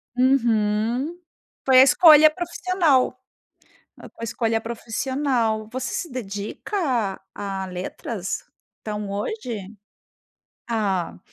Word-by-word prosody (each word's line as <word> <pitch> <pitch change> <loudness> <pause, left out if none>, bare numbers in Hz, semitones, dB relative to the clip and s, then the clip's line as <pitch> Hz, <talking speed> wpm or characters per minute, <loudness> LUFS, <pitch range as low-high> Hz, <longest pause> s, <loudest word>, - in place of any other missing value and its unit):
Uhum. 240 +3 +1 0.5
Foi 260 -1 +7
a - - +10
escolha 310 +2 +8
profissional. 340 -6 +1 0.8
Foi - - -12
a - - -4
escolha 225 0 -1
profissional. 230 -1 -1
Você 260 +1 -4
se 340 - -4
dedica 210 - -5 0.6
a 195 -1 -4
a - - -4
letras? 185 +2 -5 0.4
Então, 210 -2 -4
hoje? 210 - -4 1.0
Ah. 195 -7 -1
230 Hz, 95 wpm, -23 LUFS, 210-270 Hz, 1.0 s, a